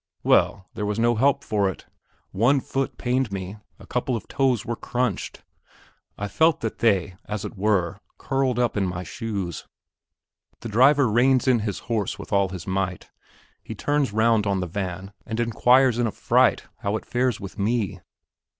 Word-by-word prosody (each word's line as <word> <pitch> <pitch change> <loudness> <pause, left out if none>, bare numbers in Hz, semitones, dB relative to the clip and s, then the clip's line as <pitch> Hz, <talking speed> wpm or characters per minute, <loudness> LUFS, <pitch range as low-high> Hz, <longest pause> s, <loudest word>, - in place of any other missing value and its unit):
Well, 100 -1 +3
there 105 - -3
was 105 0 -2
no 120 +1 +3
help 140 +4 +2
for 100 -3 +1
it; 95 - -8 0.5
one 120 +8 +3
foot 135 +1 -3
pained 125 -2 0
me, 95 +1 -5 0.2
a - - -14
couple 125 +1 -1
of 110 - -6
toes 130 -6 +1
were 120 - -2
crunched. 120 -3 -3 0.7
I 105 - -3
felt 160 +9 +2
that 115 - -4
they, 95 -5 +1
as 105 -2 -4
it - - -7
were, 100 -2 0 0.2
curled 135 -2 0
up 120 -2 +1
in 100 - +1
my 90 0 -4
shoes. 100 - -5 0.9
The 115 - -6
driver 130 +5 +5
reins 125 +4 +3
in 125 -2 +4
his 105 -3 -3
horse 110 -4 -1
with - - -8
all 100 -1 +3
his 90 -3 -7
might. 95 -1 -3 0.5
He - - -8
turns 145 -3 0
round 110 -1 +2
on 100 -1 +1
the 90 - -2
van 95 +2 -5
and 110 +1 -5
inquires 120 +2 +4
in 120 - +2
a - - -2
fright - - +2 0.2
how 100 +1 -1
it - - -10
fares 125 -2 0
with 100 +1 -9
me. 105 -2 0
110 Hz, 175 wpm, -24 LUFS, 100-125 Hz, 0.9 s, driver